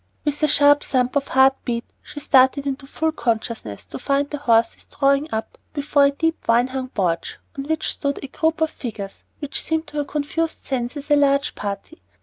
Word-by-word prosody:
With 295 Hz, 0 st, -1 dB
a 305 Hz, -, +4 dB
sharp 290 Hz, 0 st, +5 dB
thump 255 Hz, 0 st, 0 dB
of 280 Hz, -1 st, +1 dB
heart 265 Hz, 0 st, +5 dB
beat 235 Hz, -1 st, -2 dB, 0.2 s
she 290 Hz, -, -9 dB
started 265 Hz, 0 st, +4 dB
into 275 Hz, 0 st, -3 dB
full 320 Hz, +3 st, -1 dB
consciousness 225 Hz, -, -3 dB
to -, -, -8 dB
find 280 Hz, +2 st, +1 dB
the 295 Hz, -, -3 dB
horses 230 Hz, -5 st, +2 dB
drawing 280 Hz, +2 st, +1 dB
up 220 Hz, 0 st, -4 dB
before 285 Hz, -1 st, +3 dB
a -, -, +5 dB
deep 325 Hz, +3 st, -1 dB
vine 240 Hz, +2 st, +3 dB
hung 260 Hz, 0 st, -4 dB
porch, 175 Hz, -7 st, -1 dB, 0.2 s
on 275 Hz, -1 st, -5 dB
which 315 Hz, +1 st, -1 dB
stood 280 Hz, -1 st, -2 dB
a -, -, -4 dB
group 320 Hz, +4 st, -1 dB
of 320 Hz, 0 st, +2 dB
figures 205 Hz, -6 st, -7 dB
which 290 Hz, -2 st, -3 dB
seemed 320 Hz, 0 st, -1 dB
to 300 Hz, -, -7 dB
her 290 Hz, -, 0 dB
confused 305 Hz, +3 st, -2 dB
senses 270 Hz, +3 st, -3 dB
a -, -, +7 dB
large 280 Hz, 0 st, +3 dB
party. 205 Hz, +10 st, -6 dB
280 Hz, 195 wpm, -22 LUFS, 250-295 Hz, 0.2 s, a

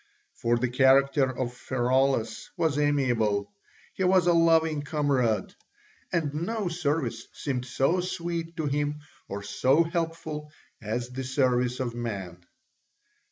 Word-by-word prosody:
For 120 Hz, -2 st, +1 dB
the 125 Hz, +2 st, 0 dB
character 135 Hz, +2 st, +4 dB
of 125 Hz, -1 st, -3 dB
Pheraulas 125 Hz, -2 st, 0 dB
was 160 Hz, -4 st, +1 dB
amiable: 115 Hz, -9 st, +1 dB, 0.4 s
he 190 Hz, -, -2 dB
was 185 Hz, -1 st, +4 dB
a 175 Hz, -, +4 dB
loving 160 Hz, -2 st, +3 dB
comrade, 140 Hz, -, 0 dB, 0.6 s
and 155 Hz, -4 st, 0 dB
no 185 Hz, +5 st, -2 dB
service 145 Hz, -8 st, -2 dB
seemed 130 Hz, -3 st, -3 dB
so 135 Hz, +8 st, +1 dB
sweet 170 Hz, -1 st, -4 dB
to 160 Hz, -, -1 dB
him 145 Hz, +1 st, -1 dB, 0.3 s
or 100 Hz, 0 st, -5 dB
so 135 Hz, +9 st, +3 dB
helpful 165 Hz, -3 st, -4 dB, 0.3 s
as 120 Hz, +3 st, -3 dB
the 130 Hz, +1 st, -5 dB
service 125 Hz, -2 st, +1 dB
of 125 Hz, -3 st, -2 dB
man. 100 Hz, -7 st, -5 dB
140 Hz, 125 wpm, -27 LUFS, 120-160 Hz, 0.6 s, character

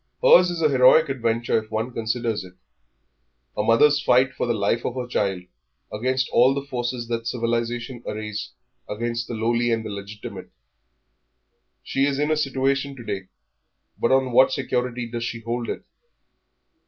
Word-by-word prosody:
Hers 470 Hz, -, +7 dB
is 170 Hz, -2 st, -3 dB
an 155 Hz, -, +4 dB
heroic 135 Hz, +4 st, +6 dB
adventure 115 Hz, -3 st, 0 dB
if 110 Hz, -, -20 dB
one 110 Hz, +3 st, -3 dB
considers 115 Hz, -1 st, -2 dB
it 90 Hz, 0 st, -14 dB, 1.0 s
a -, -, 0 dB
mother's 130 Hz, +7 st, +4 dB
fight 130 Hz, -2 st, +3 dB
for -, -, -2 dB
the 120 Hz, -, +1 dB
life 105 Hz, +3 st, 0 dB
of 120 Hz, -, -3 dB
her 125 Hz, -1 st, -3 dB
child 100 Hz, -6 st, -1 dB, 0.5 s
against 130 Hz, +4 st, 0 dB
all 130 Hz, +3 st, +4 dB
the 140 Hz, 0 st, -4 dB
forces 120 Hz, -2 st, -3 dB
that 115 Hz, -1 st, -2 dB
civilisation 120 Hz, +1 st, -2 dB
arrays 105 Hz, 0 st, -4 dB, 0.4 s
against 115 Hz, +2 st, -3 dB
the 120 Hz, -, -5 dB
lowly 120 Hz, +2 st, +1 dB
and 115 Hz, -1 st, 0 dB
the -, -, -4 dB
illegitimate. 100 Hz, +1 st, -8 dB, 1.3 s
She 135 Hz, +1 st, +1 dB
is 140 Hz, -1 st, -1 dB
in 150 Hz, +2 st, 0 dB
a -, -, +3 dB
situation 135 Hz, -1 st, 0 dB
to 120 Hz, -, -10 dB
day, 95 Hz, -4 st, -5 dB, 0.7 s
but 115 Hz, -, +1 dB
on 130 Hz, -1 st, +3 dB
what 130 Hz, +3 st, +5 dB
security 125 Hz, -3 st, -2 dB
does 115 Hz, 0 st, -5 dB
she 115 Hz, -1 st, -4 dB
hold 115 Hz, +1 st, -3 dB
it? -, -, -5 dB
120 Hz, 165 wpm, -23 LUFS, 115-130 Hz, 1.3 s, Hers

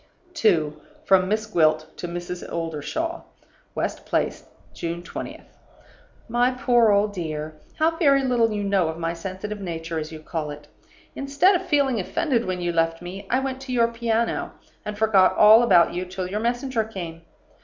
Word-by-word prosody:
2. 160 Hz, -, +1 dB, 0.2 s
From 185 Hz, -1 st, +4 dB
Miss 215 Hz, +1 st, 0 dB
Gwilt 155 Hz, -6 st, +1 dB
to 175 Hz, -, -5 dB
Mrs. 175 Hz, +1 st, -5 dB
Oldershaw. 170 Hz, -, -3 dB, 0.5 s
"West -, -, -3 dB
Place, -, -, -1 dB, 0.3 s
June 170 Hz, +1 st, -4 dB
20th. -, -, -7 dB, 0.8 s
"MY 240 Hz, +2 st, +2 dB
POOR 240 Hz, -2 st, +3 dB
OLD 205 Hz, +1 st, +2 dB
DEAR 155 Hz, -4 st, -4 dB, 0.2 s
How 325 Hz, +1 st, +2 dB
very 275 Hz, -4 st, +4 dB
little 240 Hz, -3 st, +2 dB
you 205 Hz, -1 st, -2 dB
know 195 Hz, -4 st, +2 dB
of 160 Hz, 0 st, -4 dB
my 165 Hz, 0 st, -2 dB
sensitive 190 Hz, +4 st, -6 dB
nature, 165 Hz, -2 st, -4 dB
as 155 Hz, 0 st, -6 dB
you 160 Hz, -, -8 dB
call 155 Hz, 0 st, -4 dB
it! 145 Hz, 0 st, -9 dB, 0.5 s
Instead 280 Hz, +8 st, +3 dB
of 370 Hz, 0 st, -1 dB
feeling 280 Hz, -7 st, +2 dB
offended 235 Hz, -, 0 dB
when 185 Hz, -1 st, -2 dB
you 175 Hz, -1 st, -1 dB
left 165 Hz, +1 st, 0 dB
me, 185 Hz, +3 st, -8 dB
I 255 Hz, +2 st, +2 dB
went 265 Hz, -1 st, -4 dB
to 265 Hz, -1 st, -7 dB
your 235 Hz, -2 st, +3 dB
piano, 230 Hz, 0 st, -1 dB, 0.3 s
and 210 Hz, 0 st, -5 dB
forgot 210 Hz, -4 st, +4 dB
all 215 Hz, +2 st, +8 dB
about 180 Hz, -8 st, +5 dB
you 180 Hz, +1 st, -3 dB
till 185 Hz, 0 st, -5 dB
your 205 Hz, +3 st, -3 dB
messenger 240 Hz, +1 st, -1 dB
came. 175 Hz, -7 st, -7 dB
200 Hz, 170 wpm, -24 LUFS, 170-240 Hz, 0.8 s, all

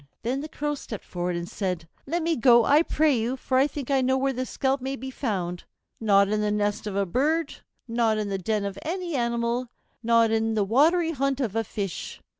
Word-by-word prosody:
Then 255 Hz, +4 st, -1 dB
the 310 Hz, -, -7 dB
Crow 295 Hz, 0 st, -2 dB
stepped 230 Hz, -7 st, -7 dB
forward 175 Hz, 0 st, -3 dB
and 170 Hz, 0 st, -4 dB
said, 180 Hz, -4 st, -3 dB, 0.2 s
"Let 335 Hz, +3 st, -1 dB
me 330 Hz, 0 st, +1 dB
go, 235 Hz, -2 st, +5 dB
I 295 Hz, +2 st, +5 dB
pray 310 Hz, -3 st, +2 dB
you, 240 Hz, +3 st, -1 dB
for 260 Hz, 0 st, +1 dB
I 275 Hz, -, +4 dB
think 285 Hz, -2 st, -6 dB
I 270 Hz, -1 st, +3 dB
know 260 Hz, +1 st, +2 dB
where 270 Hz, 0 st, 0 dB
the 255 Hz, +1 st, -3 dB
scalp 270 Hz, 0 st, 0 dB
may 265 Hz, +1 st, -3 dB
be 265 Hz, 0 st, -7 dB
found; 185 Hz, -9 st, -3 dB, 0.4 s
not 200 Hz, -3 st, +4 dB
in 210 Hz, +1 st, 0 dB
the 210 Hz, -, +1 dB
nest 205 Hz, 0 st, -1 dB
of 200 Hz, -, -4 dB
a 200 Hz, 0 st, +1 dB
bird, 295 Hz, -, 0 dB, 0.3 s
not 230 Hz, -2 st, +1 dB
in 210 Hz, -1 st, -2 dB
the 195 Hz, -1 st, -2 dB
den 210 Hz, +2 st, -1 dB
of 200 Hz, 0 st, -5 dB
any 350 Hz, +1 st, -3 dB
animal, 235 Hz, 0 st, 0 dB, 0.3 s
not 230 Hz, -1 st, +4 dB
in 225 Hz, 0 st, +1 dB
the 210 Hz, -, +2 dB
watery 320 Hz, -, +3 dB
haunt 275 Hz, -2 st, -1 dB
of 230 Hz, -6 st, -2 dB
a 225 Hz, -, +1 dB
fish. 195 Hz, -4 st, -5 dB
235 Hz, 225 wpm, -26 LUFS, 210-275 Hz, 0.4 s, go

